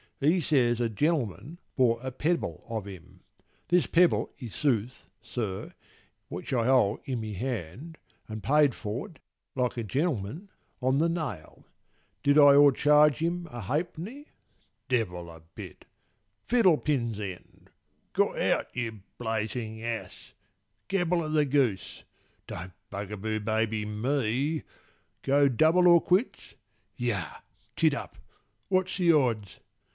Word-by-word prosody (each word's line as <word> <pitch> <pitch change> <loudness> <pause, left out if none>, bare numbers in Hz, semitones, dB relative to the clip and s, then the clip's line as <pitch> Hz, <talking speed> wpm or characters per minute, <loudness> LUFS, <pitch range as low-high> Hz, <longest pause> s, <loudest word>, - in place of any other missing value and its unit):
He 155 +6 +3
says 125 -7 +2
a 120 -1 +1
gen'lman 135 - -1 0.2
bought 120 -2 +2
a 130 - -3
pebble 160 +7 -2
of 110 -4 -4
him, 95 -1 -12 0.5
(This 175 0 +3
pebble 175 +1 +3
i' 125 - -5
sooth, 120 -1 -1
sir, 105 -6 -5 0.5
which - - -6
I 120 -3 +2
hold 125 -5 +3
i' 130 - -1
my 110 -2 -4
hand)— 120 - -5 0.3
And 110 -1 -7
paid 145 -2 +3
for't, 115 +8 -6 0.4
like 125 -2 -1
a 115 - -2
gen'lman, 140 - -2 0.3
on 130 +2 +2
the 165 +3 +2
nail. 155 - -5 0.6
"Did 145 +1 +4
I 145 -1 +8
o'ercharge 145 0 +5
him 170 +3 -2
a 120 -1 -6
ha'penny? 170 - -4 0.6
Devil 90 -9 -1
a 80 0 -12
bit. - - -10 0.6
Fiddlepin's 150 - +2
end! 95 -4 -9 0.4
Got - - +1
out, - - 0
you 115 -4 -4 0.2
blazing 110 0 -3
ass! 115 -1 -6 0.5
Gabble 180 -3 +1
o' 155 - -4
the 155 -1 +2
goose. 130 - 0 0.4
Don't 95 0 -7 0.2
bugaboo 105 +2 -4
baby 110 0 -1
me! 130 +6 -1 0.6
Go 140 +1 +4
double 160 +8 +4
or 170 -1 +7
quits? 190 +8 0 0.4
Yah! 105 - -2 0.4
tittup! - - 0 0.5
what's 185 0 +1
the 175 -3 +4
odds?" 110 - 0
125 Hz, 125 wpm, -28 LUFS, 110-155 Hz, 0.6 s, I